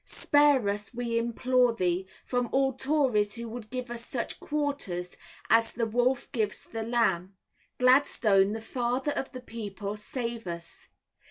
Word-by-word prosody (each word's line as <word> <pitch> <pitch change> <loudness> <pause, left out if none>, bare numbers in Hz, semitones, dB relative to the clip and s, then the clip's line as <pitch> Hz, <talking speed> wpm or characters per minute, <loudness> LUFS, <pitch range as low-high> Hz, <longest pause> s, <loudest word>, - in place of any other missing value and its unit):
Spare 290 -6 +3
us 205 0 -1
we 235 -1 0
implore 245 +1 +2
thee. 180 -1 0 0.2
From 245 -2 -1
all 270 0 +3
tories 260 -6 +1
who 235 0 -6
would 225 -1 -8
give 250 -1 -5
us 235 -1 -3
such - - -3
quarters 280 -13 -2 0.3
as 225 0 +4
the 230 - 0
wolf 245 +3 0
gives 220 -6 -1
the 225 - -5
lamb. 200 -6 0 0.4
Gladstone, 230 -6 +4
the 225 - -4
father 250 +4 -1
of 270 - -3
the 255 - -8
people, 210 -4 -6
save 230 0 -5
us! 170 0 -7
235 Hz, 150 wpm, -28 LUFS, 210-255 Hz, 0.4 s, as